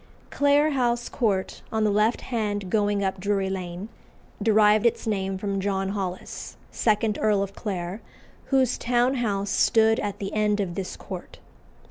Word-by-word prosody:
Clare 285 +2 +3
House 240 -3 0
Court, 200 -6 -1
on 220 -1 0
the 210 - +3
left 210 +3 +2
hand 205 -5 -2
going 205 -2 +1
up 190 0 -1
Drury 195 0 0
Lane, 180 +1 -5 0.5
derived 215 0 +4
its 235 - -1
name 195 -3 -1
from 195 0 -2
John 195 0 -1
Holles, 190 -2 -5
second 215 -1 +1
Earl 210 -2 +3
of 195 0 -6
Clare, 190 0 -4 0.4
whose 260 -3 +2
town 245 +2 +2
house 200 -4 -1
stood 225 0 +4
at 205 -1 -3
the 195 -1 -5
end 210 -1 +1
of 190 -4 -1
this 185 +1 -5
court. - - -8
205 Hz, 155 wpm, -25 LUFS, 195-225 Hz, 0.5 s, derived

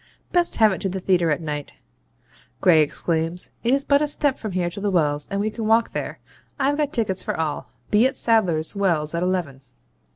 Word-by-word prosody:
Best 350 -1 +1
have 220 -2 +5
it 190 - -4
to 195 - -1
the 190 +1 -4
theatre 180 -3 +2
at 150 +2 0
night,' 150 -2 -5 0.9
Gray 170 -5 +5
exclaims; 165 +3 -1
'it 235 - +1
is 275 +1 +2
but 280 0 +3
a 300 - +1
step 290 -2 +1
from 215 -4 -5
here 180 -1 0
to 200 - -8
the 205 - 0
Wells, 150 -5 0
and 200 - -2
we 215 +2 -1
can 220 0 -4
walk 225 +1 +3
there. - - -4 0.4
I've 280 +1 +1
got 295 -2 0
tickets 205 - 0
for - - -4
all. 155 -2 -3 0.2
Be 215 +4 +5
at 265 - -6
Sadler's 185 -8 +1
Wells 170 -6 +1
at 170 - -1
eleven.' 175 -7 -2
190 Hz, 215 wpm, -23 LUFS, 165-230 Hz, 0.9 s, have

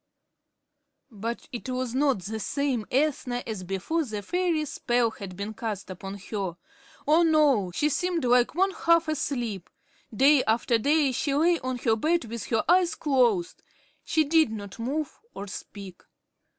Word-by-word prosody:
But 225 +2 -5
it 250 +1 -6
was 255 -1 -2
not 270 -7 +1
the 220 +3 -4
same 260 -1 -1
Ethna 260 -3 0
as 215 -5 -5
before 195 - -1
the 215 -6 -5
fairy 345 - 0
spell 240 -4 0
had 190 -4 -9
been 205 +2 -4
cast 210 -4 -5
upon 195 +2 -7
her. 195 -5 -3 0.5
Oh, 315 +3 +5
no! 300 - +3
She 295 - +2
seemed 340 +1 -1
like 245 +2 +3
one 385 +2 +2
half 335 -2 +2
asleep. 245 - -3 0.4
Day 270 +4 +5
after 230 +1 +2
day 290 +3 +3
she 275 +3 -1
lay 335 +3 +3
on 255 0 -3
her 225 -2 +1
bed 320 +6 +1
with 230 0 -6
her 225 - +1
eyes 355 -1 +4
closed. 245 - +1 0.4
She 315 - +2
did 315 -2 +3
not 205 -1 -7
move 280 +5 -3 0.2
or 200 - -5
speak. 195 -1 -9
250 Hz, 155 wpm, -26 LUFS, 215-305 Hz, 0.5 s, Oh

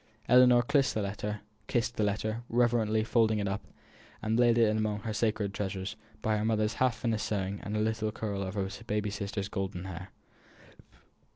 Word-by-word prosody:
Ellinor 125 -1 +7
kissed 140 +1 +2
the 110 - +1 1.0
letter, 110 +3 -1
reverently 115 -2 +2
folded 110 -1 +3
it 100 -1 -1
up, 95 0 -3 0.5
and 110 +2 0
laid 120 -1 +5
it 110 -2 +4
among 105 -1 -1
her 110 +2 -3
sacred 105 -2 0
treasures, 95 -1 -3 0.3
by 110 -1 +2
her 105 - -1
mother's 110 -1 +1
half 130 -2 +4
finished 115 -3 -1
sewing, 100 -1 -2
and 105 +1 -3
a - - +1
little 110 0 0
curl 105 -2 -3
of 95 +1 -4
her 100 -2 0 0.2
baby 105 -1 -1
sister's 100 0 -3
golden 95 -3 -3
hair. 95 -1 -7
110 Hz, 165 wpm, -30 LUFS, 100-115 Hz, 1.0 s, Ellinor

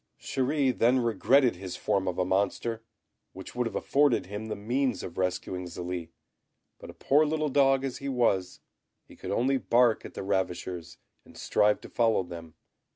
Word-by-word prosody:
Chéri 135 0 0
then 120 +3 +3
regretted 125 0 +3
his 95 -1 -6
form 95 -1 -1
of 90 - -2
a 90 - +1
monster, 100 +4 -1 0.5
which 95 0 -10
would 125 -1 -1
have - - -7
afforded 140 -7 +2
him 105 +3 -6
the 110 - -3
means 125 +2 -1
of 85 - -7
rescuing 90 0 -2
Zélie; 85 -1 -5 0.7
but - - -11
a - - -9
poor 145 +3 +3
little 155 0 0
dog 135 -1 +3
as 130 - -4
he 140 - -4
was, 115 -8 0 0.4
he - - -17
could - - -8
only 135 +3 +1
bark 120 -2 +3
at - - -10
the - - -5
ravishers 90 -3 -3 0.3
and - - -17
strive 105 0 +2
to - - -11
follow 115 -4 +2
them. 85 -2 -10
110 Hz, 175 wpm, -28 LUFS, 95-130 Hz, 0.7 s, then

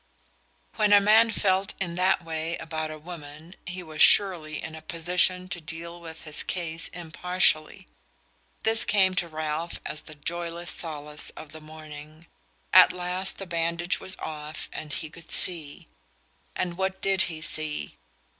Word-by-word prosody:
When 210 -2 +3
a 205 - +9
man 220 +3 +5
felt 190 -3 0
in 175 -3 -3
that 180 0 +1
way 160 +1 -3
about 155 -1 -5
a 155 - -7
woman 155 0 -11
he 180 0 -6
was 155 -2 -5
surely 170 -6 +4
in 160 - -7
a 160 - -9
position 180 +3 +2
to 175 -2 -4
deal 170 +2 -6
with 160 -1 -11
his 150 -2 -1
case 165 -2 -3
impartially. 175 -1 +1 0.8
This 225 0 +6
came 190 -3 +3
to 180 -2 -1
Ralph 155 +1 -4
as 150 - -5
the 155 - -12
joyless 170 +3 -4
solace 150 -2 -4
of 155 - -10
the 155 +1 -11
morning. 155 0 -12 0.5
At - - +8
last 180 +1 -1
the 195 - -5
bandage 170 0 -1
was 185 - -3
off 155 0 -7
and 155 -1 -7
he 160 - -4
could 165 0 -14
see. 160 -5 +5 0.7
And 175 0 -3
what 190 0 -2
did 195 -1 +1
he 160 -2 -7
see? 155 - 0
170 Hz, 155 wpm, -26 LUFS, 155-180 Hz, 0.8 s, a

